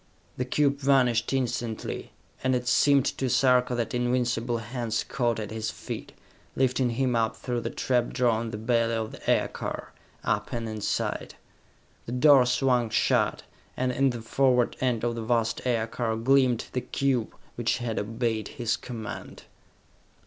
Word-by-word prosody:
The 125 - -2
cube 140 +2 +1
vanished 125 -5 +3
instantly, 120 -4 -2 0.3
and 130 0 +2
it 125 0 -2
seemed 140 +1 +4
to 130 - -1
Sarka 125 0 +3
that 120 -1 -2
invisible 120 -1 0
hands 115 -1 -2
caught 120 -4 -1
at 105 -1 -5
his 110 0 -3
feet, - - -7 0.4
lifting 130 -1 +2
him 125 +1 0
up 110 -1 +1
through 120 +1 -3
the 115 - -3
trap 125 -1 0
door 120 -3 +2
in 115 - -4
the 110 - -5
belly 115 +1 +1
of 110 -1 -3
the - - -7
aircar, - - -1 0.3
up - - -1
and 115 -1 -3
inside. 110 -2 -2 0.7
The 120 - -4
door 130 -1 +6
swung 125 -2 +2
shut, - - +1 0.3
and 130 0 +1
in 135 +2 +2
the 120 -2 -4
forward 125 0 +2
end 125 -4 0
of 120 -1 +1
the 115 - -4
vast 115 0 0
aircar 115 -1 0
gleamed 125 0 +3
the 125 - 0
cube 130 -5 -1 0.2
which 120 +1 0
had 120 -3 -2
obeyed 110 0 -2
his 120 -3 0
command! 115 -3 -7
120 Hz, 155 wpm, -27 LUFS, 115-125 Hz, 0.7 s, door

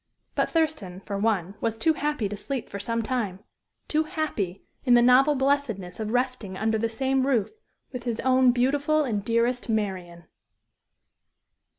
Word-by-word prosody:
But - - 0
Thurston, 305 - -1
for 200 - -5
one, 200 -4 0
was 225 -1 -1
too 320 +7 +3
happy 295 -7 -1
to 205 - -5
sleep 255 +4 -4
for 200 - -6
some 230 +3 -1
time; 215 -6 -2 0.5
too 310 +1 +1
happy 295 - -3 0.2
in 245 -3 +5
the 240 - +6
novel 265 +4 +5
blessedness 265 -10 -1
of 215 -1 -3
resting 245 -5 -1
under 220 +1 0
the 230 +1 0
same 265 +3 0
roof 235 -7 +1 0.4
with 250 - -5
his 235 -2 -2
own 260 -1 +4
beautiful 285 +5 +2
and 215 -7 -2
dearest 235 +2 0
Marian. 185 -6 -2
235 Hz, 160 wpm, -26 LUFS, 205-270 Hz, 0.5 s, the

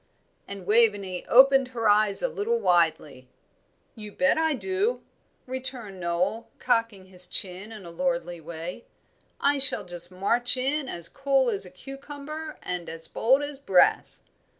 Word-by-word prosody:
and 200 -2 -8
Waveney 205 -4 +1
opened 270 +1 +5
her 225 -1 0
eyes 210 -1 +4
a - - +2
little 470 0 -2
widely. 160 - 0 0.7
"You 210 -2 -10
bet 275 +6 +2
I 320 -2 0
do," 390 - -2 0.4
returned 250 -6 -4
Noel, 180 +6 -2
cocking 230 -6 -1
his 180 -1 +3
chin 190 +4 -2
in 210 -4 -11
a 170 - -10
lordly 255 -6 -3
way. 170 +6 -8 0.5
"I 285 0 +1
shall 270 -6 +2
just 175 0 -2
march 235 +7 +2
in 270 +2 -1
as 170 -1 +4
cool 270 -2 0
as 195 -3 0
a - - -11
cucumber, 285 - -9
and 180 -1 -5
as 165 0 -7
bold 265 +5 +1
as 290 -1 -5
brass. 190 -10 +1
225 Hz, 150 wpm, -25 LUFS, 180-270 Hz, 0.7 s, opened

